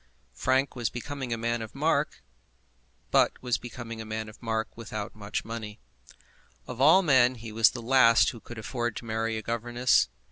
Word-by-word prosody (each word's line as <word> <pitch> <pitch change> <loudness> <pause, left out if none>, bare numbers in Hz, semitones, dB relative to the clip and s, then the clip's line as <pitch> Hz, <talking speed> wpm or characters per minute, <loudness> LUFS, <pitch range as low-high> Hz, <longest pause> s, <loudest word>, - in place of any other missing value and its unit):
Frank 130 - +1
was 120 -4 -1
becoming 135 0 -6
a 115 - 0
man 115 +1 -1
of 110 - -8
mark, - - 0 0.9
but - - +4
was 125 -2 0
becoming 115 -1 -7
a - - -5
man 110 0 -4
of 110 - -16
mark 110 -1 -2
without 110 -2 -6
much 105 -1 -4
money. 110 -2 -7 0.9
Of 125 0 -6
all 160 +7 +7
men 130 -5 +4
he 115 -2 -9
was 110 +1 +5
the 120 - -8
last 115 -2 +5
who 115 - -11
could 120 +2 -11
afford 120 +1 -3
to - - -7
marry 110 0 -1
a 110 - -5
governess. 120 +2 +2
115 Hz, 180 wpm, -28 LUFS, 110-125 Hz, 0.9 s, all